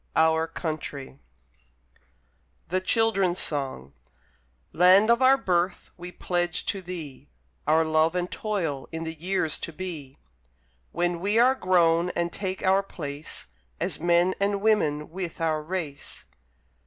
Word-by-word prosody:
FOURTH 160 0 0
READER 135 -1 -9 1.5
THE 185 +2 0
CHILDREN'S 195 -4 +2
SONG 135 - -2 0.8
Land 185 +6 +6
of 235 +2 +3
our 265 +1 +6
Birth, 175 -4 -1
we 180 0 -8
pledge 175 -2 -2
to 195 - -2
thee 155 -7 -8 0.4
Our 160 +1 +4
love 160 +2 +2
and 180 0 -2
toil 170 -11 -3
in 160 0 -4
the 160 0 -4
years 165 -1 -1
to - - -5
be, 155 -6 -7 0.7
When 175 0 -1
we 205 +5 +1
are 250 +3 +6
grown 175 -6 +3
and 170 0 -1
take 190 -1 -4
our 190 +1 +4
place, 150 -6 -6 0.3
As - - -2
men 175 +2 +3
and 200 0 +1
women 155 -9 +1
with 180 -1 -5
our 160 -2 0
race. 155 -3 -6
175 Hz, 130 wpm, -26 LUFS, 155-190 Hz, 1.5 s, Land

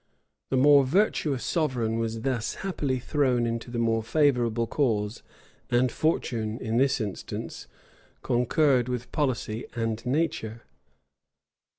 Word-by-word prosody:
The 130 - +1
more 140 +1 +6
virtuous 150 - +1
sovereign 125 -8 0
was 115 0 -2
thus 125 -3 -1
happily 145 -9 -1
thrown 125 -2 +1
into 115 +1 -3
the 120 - -4
more 115 -1 +1
favorable 120 -3 +2
cause; 110 -5 -1 0.5
and 125 0 +2
fortune, 115 -8 -1
in 115 -1 -2
this 135 +1 +3
instance, 105 -4 -5 0.6
concurred 125 +1 +2
with 125 -1 -4
policy 125 -6 -1
and 115 -1 -2
nature. 125 -5 -2
125 Hz, 115 wpm, -27 LUFS, 115-140 Hz, 0.6 s, more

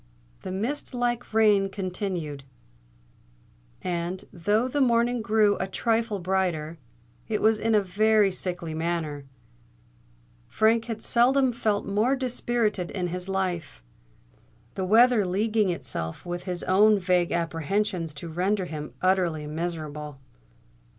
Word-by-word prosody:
The - - -6
mist 245 +8 -3
like 245 0 -1
rain 210 -3 +4
continued; 180 -7 -4 1.4
and, 175 +1 -3
though 205 +7 +1
the 285 +3 -1
morning 240 -1 +2
grew 215 -2 +3
a - - -2
trifle 225 +2 0
brighter, 175 -4 -1 0.5
it 215 - -1
was 220 0 +3
in 225 0 +2
a 210 - +5
very 210 +2 +3
sickly 175 -3 -5
manner. 160 -3 -3 1.2
Frank 225 +1 +2
had 225 -2 -5
seldom 255 +2 +3
felt 215 -3 -1
more 215 +7 +1
dispirited 235 -7 -1
in 180 -2 -3
his 180 +2 -5
life, 180 - -3 0.9
the 190 - -2
weather 230 +2 +5
leaguing 210 +2 +1
itself 80 - -4
with 175 0 -5
his 180 -2 -2
own 210 +3 +5
vague 180 -2 +1
apprehensions 170 +1 -1
to 155 +4 -7
render 185 +4 0
him 150 -6 -7
utterly 180 -5 +1
miserable. 150 -3 -5
190 Hz, 125 wpm, -26 LUFS, 170-220 Hz, 1.4 s, a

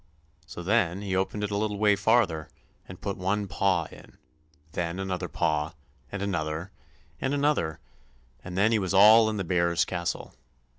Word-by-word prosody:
So 90 - -8
then 100 -1 +1
he 95 -2 -2
opened 95 +2 -1
it 105 - -2
a 100 - 0
little 105 -1 -1
way 105 0 +4
farther, 100 -7 +2 0.4
and 90 - -9
put 100 -1 -4
one 100 +2 -1
paw 95 -2 +1
in, - - -12
and - - -20 0.5
then 85 +3 -3
another 95 -2 -3
paw, 75 +1 -1 0.4
and 100 -1 -4
another, 85 -2 -3 0.5
and 135 +2 -1
another, 140 - 0 0.6
and 90 0 -7
then 105 +3 +4
he 110 - +3
was 95 -1 -1
all 110 +3 +8
in 110 - -3
the 95 - -1
bears' 85 -1 +1
castle. 85 -2 -4
95 Hz, 170 wpm, -27 LUFS, 85-105 Hz, 0.6 s, all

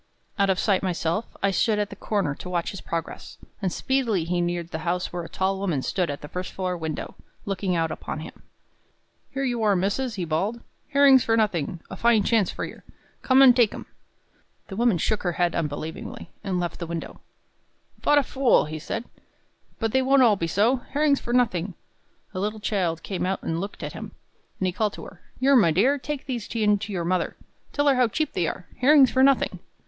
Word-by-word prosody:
Out 200 0 +3
of 190 - +2
sight 195 -2 +2
myself, 180 +3 -1 0.2
I 195 - +3
stood 215 +2 +2
at 205 -1 -1
the - - -7
corner 200 -7 -1
to 180 - -9
watch 175 -2 -1
his 195 - -8
progress; 165 -1 -5 0.2
and 190 -2 0
speedily 235 -6 0
he 175 +1 -1
neared 175 -1 -2
the 160 - -3
house 175 +2 -2
where 175 - -2
a 165 - -8
tall 190 0 -1
woman 170 -9 -1
stood 180 -3 -1
at 145 - -4
the 150 - -8
first 180 +4 -5
floor 185 -1 -2
window, 160 -3 -5 0.3
looking 195 -2 -1
out 165 -1 0
upon 155 - -5
him. - - -10 0.9
"Here 270 0 -3
you 240 -3 -1
are, 210 -2 +3
missus," 205 +7 -1
he 185 -4 -3
bawled, 190 +9 -1 0.3
"herrings 280 -3 +6
for 225 0 +2
nothing! 175 -6 0
A - - -4
fine 235 -3 +3
chance 215 -4 +2
for - - -4
yer! - - -11 0.4
Come 265 +1 +5
an' 255 -2 +9
take 235 -4 +3
'em." - - -8 0.8
The 195 - -6
woman 230 -3 +3
shook 210 +6 0
her 175 -2 -1
head 175 0 +1
unbelievingly, 160 +1 -5
and 185 -2 -1
left 175 -1 -3
the 170 - -4
window. 165 -1 -6 0.8
"Vot 295 - +3
a 290 - +5
fool!" 260 - +3
said 225 +9 -4
he. - - -30 0.6
"But 225 -2 -1
they 265 - +3
won't 265 0 +5 0.2
be 165 - 0
all - - -2
so. 210 +9 +3
Herrings 285 +3 +1
for 240 - -6
nothing!" 200 -7 +1 0.6
A 185 - -3
little 210 +2 -2
child 180 -6 -1
came 190 - -3
out 190 - -1
to - - -7
look 170 +5 -4
at - - -5
him, - - -8 0.5
and 190 - 0
he 180 - 0
called 210 +1 0
to - - -9
her, 175 - -13 0.2
"Yer, 275 +2 +4
my 210 -9 +6
dear, 240 - +3
take 295 0 -5
these 245 -5 -4
in 210 -2 +3
to 210 +1 -6
your 175 -3 -2
mother. 180 0 -1 0.3
Tell 290 - 0
her 280 - +6
how 250 -1 +4
cheap 305 +7 -2
they 170 -3 0
are 180 - -5
herrings 275 0 +6
for 260 - +2
nothing." 275 0 +3
195 Hz, 215 wpm, -25 LUFS, 175-240 Hz, 0.9 s, an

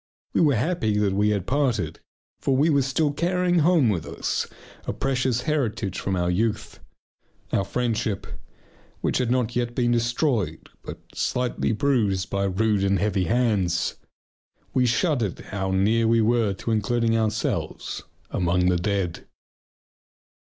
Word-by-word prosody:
We - - +3
were 145 -5 +4
happy 115 -4 0
that 105 -2 +1
we 105 +2 +2
had 100 -4 0
parted, 120 - 0 0.4
for 135 -1 +1
we 155 +4 +3
were 140 -1 +4
still 135 +3 +1
carrying 180 +2 +1
home 160 -6 +4
with 90 -6 -1
us - - -2 0.4
a - - -1
precious 130 -2 0
heritage 120 - -1
from 95 - -1
our 90 0 +1
youth: 110 +3 -1 0.7
our 100 - +2
friendship 110 -1 -1 0.8
which - - 0
had 125 -2 0
not 125 -2 0
yet 120 -1 -1
been 120 -1 +2
destroyed, 120 - 0
but - - -8 0.2
slightly 125 -2 -1
bruised 110 -7 +1
by 100 0 0
rude 100 +1 +1
and 100 0 +2
heavy 100 -1 0
hands. 100 -5 +1 0.8
We 125 -1 +3
shuddered 120 - +1
how 95 -1 -4
near 105 +5 +2
we 115 0 +4
were 115 -2 +2
to 115 - -4
including 115 +1 +1
ourselves 110 -1 -2 0.3
among 90 +1 +2
the 90 - +2
dead. 95 -2 -2
115 Hz, 145 wpm, -24 LUFS, 100-125 Hz, 0.8 s, were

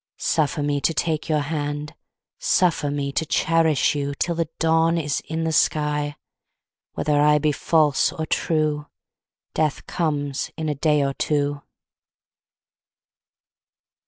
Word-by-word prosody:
Suffer 150 -1 0
me 145 -1 0
to 165 - +1
take 155 +3 -1
your 155 -1 +2
hand. 145 0 -3 0.5
Suffer 180 - +2
me 140 -1 -2
to 150 - 0
cherish 160 -2 +2
you 140 -1 -3
Till 175 - 0
the 165 -2 -2
dawn 165 +1 +3
is 150 -3 -1
in 160 +1 -2
the 160 - 0
sky. 150 -1 +1 0.8
Whether 145 -1 +1
I 150 0 +5
be 150 +1 +1
false 150 -1 +2
or 160 -3 -4
true, 155 -2 0 0.7
Death 155 -3 -1
comes 145 -4 -2
in 160 -1 -2
a - - +1
day 150 0 +2
or 135 0 -1
two. 145 0 -1
150 Hz, 130 wpm, -23 LUFS, 145-160 Hz, 0.8 s, I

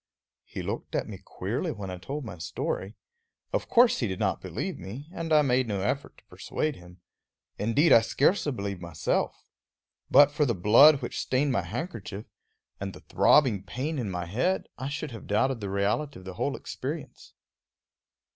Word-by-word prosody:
He - - -6
looked - - -4
at - - -1
me - - -8
queerly - - -3
when 95 -2 -6
I 90 - -6
told 140 +8 -5
my 90 -6 -8
story. 95 +5 -3 0.6
Of - - -1
course 240 0 +5
he 120 - 0
did 95 -2 -3
not - - 0
believe - - -4
me, 115 - -8
and 165 -2 -4
I 150 -1 +6
made 130 -2 +2
no 100 -3 -2
effort 140 +8 -2
to - - -20
persuade 155 -2 -3
him. 90 -1 -15 0.6
Indeed, 135 +8 +4
I 115 - +8
scarcely 145 - +2
believed 100 -6 -4
myself. 85 -1 -2 0.6
But 145 +1 +7
for 150 +1 +1
the 120 - +1
blood 130 - +7
which 120 - -4
stained 135 +2 +1
my 115 - +1
handkerchief, 105 - -6 0.5
and 95 -1 -4
the - - -12
throbbing 125 -10 +4
pain 135 - -4
in 115 -5 -2
my 90 -2 -3
head, 130 - 0
I 130 +2 -4
should 145 0 -4
have 115 - -9
doubted 120 +5 +1
the 100 -2 -4
reality 105 +10 -1
of 95 - -13
the 95 - -6
whole - - -1
experience. - - -7
115 Hz, 180 wpm, -28 LUFS, 95-145 Hz, 0.6 s, I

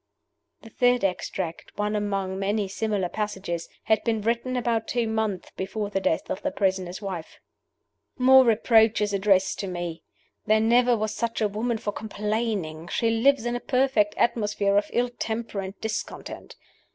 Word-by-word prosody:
The 225 - -12
third 245 0 +2
extract 180 -2 -3
one 210 +1 0
among 195 -2 -2
many 200 +1 0
similar 200 -1 -1
passages 190 -4 -4
had 220 -1 +2
been 225 -2 0
written 235 +3 -1
about 230 -2 0
two 240 -2 0
months 220 -4 -2
before 200 +2 -3
the 195 - 0
death 165 -4 0
of 190 - -3
the 290 - 0
prisoner's 190 -6 -1
wife. 185 -5 -6 0.8
"More 260 0 +7
reproaches 220 -2 +3
addressed 195 -1 +2
to 195 - -3
me! 175 -2 -4 0.5
There 215 0 +5
never 240 +2 +4
was 215 0 -2
such 230 -1 -2
a 215 - +2
woman 225 +3 -1
for 215 -2 -3
complaining; 210 -7 -3
she 225 +6 +1
lives 240 +2 +3
in 240 0 -1
a - - -1
perfect 250 -5 +2
atmosphere 210 -4 +1
of 205 0 +2
ill 245 +1 +1
temper 225 -3 -4
and 195 +1 -6
discontent. 220 0 -5
210 Hz, 160 wpm, -26 LUFS, 195-230 Hz, 0.8 s, More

